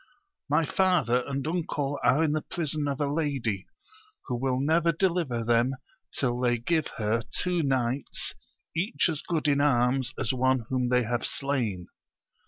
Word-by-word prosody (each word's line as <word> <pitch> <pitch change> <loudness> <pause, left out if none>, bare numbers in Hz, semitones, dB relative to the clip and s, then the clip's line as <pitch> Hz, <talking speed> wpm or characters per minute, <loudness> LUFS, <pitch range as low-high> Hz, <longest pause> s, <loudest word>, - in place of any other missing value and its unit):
— 395 - -58
My 165 - +3
father 155 - +2
and 140 0 -3
uncle 150 -4 -2
are 150 +5 +4
in 155 - +2
the 155 0 0
prison 155 -3 -2
of 140 0 -2
a 145 - +1
lady, 135 - -1 0.6
who 125 - -2
will 130 +1 0
never 165 +4 +3
deliver 165 -9 0
them 120 +3 +2 0.4
till 120 -2 -1
they 120 -1 +2
give 155 +7 0
her 110 +1 +1 0.2
two 180 -1 +1
knights 130 -2 -1 0.4
each 190 +3 +1
as 155 -3 -2
good 160 -3 -1
in 140 -1 +3
arms 130 -2 +2
as 130 -3 0
one 130 0 +2
whom 125 -1 0
they 125 0 +3
have 120 0 -1
slain. 120 -11 -1
135 Hz, 165 wpm, -27 LUFS, 125-155 Hz, 0.6 s, are